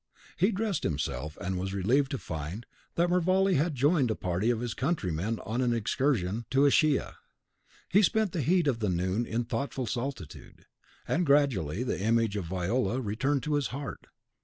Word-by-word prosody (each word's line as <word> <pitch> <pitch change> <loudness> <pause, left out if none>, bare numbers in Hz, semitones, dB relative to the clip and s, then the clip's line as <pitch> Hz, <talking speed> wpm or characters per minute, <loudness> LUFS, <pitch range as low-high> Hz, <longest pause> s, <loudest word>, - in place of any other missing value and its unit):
He 190 +7 +2
dressed 210 -1 -1
himself, 75 0 -3
and 90 0 -2
was 95 +1 -3
relieved 130 +9 +2
to 135 - -2
find 80 - -6 0.3
that 175 +1 +2
Mervale 185 +2 +3
had 155 +1 +1
joined 140 0 +3
a 110 - 0
party 90 +5 -1
of 120 -2 +1
his 120 -1 -3
countrymen 110 - -1
on 115 +5 -1
an 120 -2 +2
excursion 115 -2 0
to 135 +1 +4
Ischia. 145 0 +2 0.7
He 200 - +4
spent 215 -1 +2
the 165 - -1
heat 175 +5 +2
of 125 -5 0
noon 95 +3 0
in 115 +2 -1
thoughtful 135 +2 -3
solitude, 120 - -6 0.4
and 175 - +1
gradually 125 - +2
the 125 - -2
image 115 0 +2
of 100 -4 -2
Viola 95 +7 -1
returned 130 +4 -1
to 150 - -1
his 145 -2 +1
heart. 140 +1 -7
120 Hz, 170 wpm, -29 LUFS, 100-145 Hz, 0.7 s, to